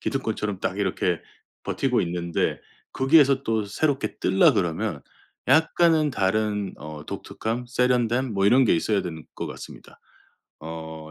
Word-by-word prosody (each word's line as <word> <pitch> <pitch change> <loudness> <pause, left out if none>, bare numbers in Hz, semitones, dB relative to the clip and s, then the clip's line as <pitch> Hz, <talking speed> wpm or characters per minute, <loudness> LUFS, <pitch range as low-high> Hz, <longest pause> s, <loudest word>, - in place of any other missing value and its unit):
기득권처럼 110 -7 -2
딱 95 +1 -2
이렇게 95 -3 0 0.4
버티고 - - 0
있는데 85 -1 -1 0.3
거기에서 135 -1 +4
또 110 -2 0
새롭게 140 +6 -1
뜰라 180 -5 +4
그러면 95 - -1 0.5
약간은 160 +1 +4
다른 105 -2 -1
어. 75 -1 -9
독특함 115 +3 -4
세련됨 125 0 +1
뭐 100 0 +2
이런 130 +5 +5
게 115 - +3
있어야 100 +4 +1
되는 80 -3 -7
것 - - -4
같습니다. - - -11 0.6
어. 80 0 -8
110 Hz, 295 characters per minute, -24 LUFS, 90-130 Hz, 0.6 s, 이런